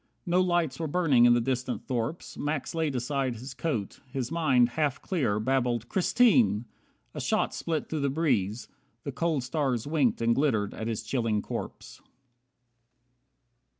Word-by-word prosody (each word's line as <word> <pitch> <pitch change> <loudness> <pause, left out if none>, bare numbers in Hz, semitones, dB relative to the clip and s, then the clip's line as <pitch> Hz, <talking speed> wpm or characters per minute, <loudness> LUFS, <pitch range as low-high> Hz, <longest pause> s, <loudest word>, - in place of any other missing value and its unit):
No 180 +1 +3
lights 175 -6 0
were 160 - -2
burning 145 -7 +4
in 120 0 +6
the - - +3
distant 125 +1 -2
thorps. 125 +6 -3
Max 145 -1 -3
laid 160 -4 -1
aside 130 0 -1
his 125 +5 -8
coat. 120 -12 -3
His 130 -1 -3
mind, 135 -8 +3
half 145 +2 -1
clear, 135 - 0
Babbled 120 -1 0
"Christine!" 175 - +3 0.5
A - - -5
shot - - 0
split 160 -2 -2
through 155 - -3
the 140 -1 +1
breeze. 125 - 0 0.4
The 140 - -4
cold 150 0 -1
stars 130 -3 -1
winked 145 -6 +1
and 115 0 +3
glittered 115 -7 +1
at 110 - -5
his 115 -1 -3
chilling 110 -3 -1
corpse. - - -7
130 Hz, 150 wpm, -28 LUFS, 120-155 Hz, 0.5 s, in